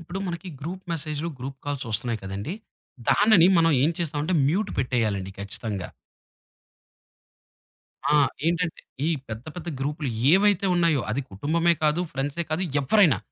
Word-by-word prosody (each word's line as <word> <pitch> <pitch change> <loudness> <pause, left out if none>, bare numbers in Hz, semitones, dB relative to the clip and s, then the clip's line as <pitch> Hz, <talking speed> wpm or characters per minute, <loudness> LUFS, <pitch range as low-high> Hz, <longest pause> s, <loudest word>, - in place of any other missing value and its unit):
ఇప్పుడు 175 +3 -6
మనకి 180 +1 -5
గ్రూప్ 180 +5 -6
మెసేజ్‌లు, 155 0 -3
గ్రూప్ 135 +1 -6
కాల్స్‌ 140 -3 -3
ఒస్తున్నాయి 115 +1 -1
కదండీ! 100 - -4 0.6
దానిని 205 -5 +6
మనం 165 0 +4
ఏం 155 - +4
చేస్తామంటే 155 +1 -1
మ్యూట్ 200 +7 0
పెట్టేయాలండి 110 -7 0
ఖచ్చితంగా. 100 -1 -4 2.2
ఆ! - - +5 0.3
ఏంటంటే 170 0 0 0.3
ఈ - - +2 0.2
పెద్ద 110 +2 -6
పెద్ద 175 -1 -6
గ్రూప్‌లు 145 0 -2 0.2
ఏవైతే 200 0 +4
ఉన్నాయో, 170 -5 +3
అది 130 +6 0
కుటుంబమే 165 - +1
కాదు, 150 +3 +3
ఫ్రెండ్సే 145 +5 -2
కాదు, 155 +4 0 0.2
ఎవ్వరైనా 145 - +4
150 Hz, 130 wpm, -25 LUFS, 125-170 Hz, 2.2 s, దానిని